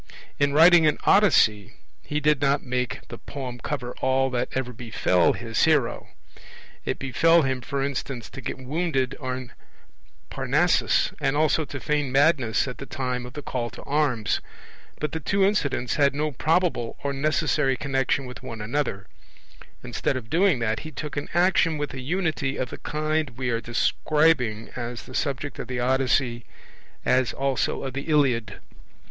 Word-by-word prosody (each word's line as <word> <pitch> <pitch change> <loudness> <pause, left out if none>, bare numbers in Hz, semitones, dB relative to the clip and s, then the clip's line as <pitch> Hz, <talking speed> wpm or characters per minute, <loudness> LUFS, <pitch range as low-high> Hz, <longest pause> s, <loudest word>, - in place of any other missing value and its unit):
In 145 0 +3
writing 165 +2 +7
an 150 - +2
Odyssey, 110 - +4 0.3
he 150 - -2
did 150 -1 +2
not 140 0 +2
make 125 0 -3
the - - -8
poem 130 -3 -7
cover 125 -1 -4
all 130 0 +2
that 125 -1 -1
ever 130 -1 -2
befell 110 -6 +1
his 115 -2 0
hero 150 -7 +1 0.8
it - - -2
befell 165 +5 +3
him, 130 -1 -1
for 135 +3 -2
instance, 135 -3 -4
to 135 - -8
get - - -4
wounded 135 -1 -1
on 130 -2 -5 0.8
Parnassus - - +2
and 135 +2 +1
also 155 0 +2
to 140 - -7
feign 145 -1 -1
madness 135 -4 +3
at 125 - -6
the 140 - -7
time 125 -2 -3
of 125 - -12
the 150 - -7
call 120 -3 -3
to - - -11
arms, 140 -7 0 0.6
but 150 -2 -2
the 160 - -3
two 195 +5 +2
incidents 145 - 0
had 140 -1 +3
no 150 +1 -1
probable 160 -4 0
or 140 -1 -1
necessary 140 -1 +1
connexion 135 0 0
with 125 0 -9
one 125 -4 -7
another 110 -3 -2 0.8
instead 130 - -1
of 115 -3 -9
doing 180 -2 +3
that, 110 -2 -1
he 155 - -7
took 150 -1 -6
an 145 - -4
action 175 -3 +3
with 145 0 -4
a 130 - -6
Unity 155 -3 -1
of 130 - -3
the - - -8
kind 155 -4 -2
we 125 -2 -1
are 115 0 -1
describing 125 -2 +1
as 120 -1 -5
the 130 - -12
subject 140 -1 -2
of - - -5
the 125 -1 -3
Odyssey, 125 -1 +1 0.6
as 130 -1 +2
also 135 -1 -1
of 130 - -4
the 140 +3 -5
Iliad. 135 -7 +2
135 Hz, 165 wpm, -25 LUFS, 125-150 Hz, 0.8 s, writing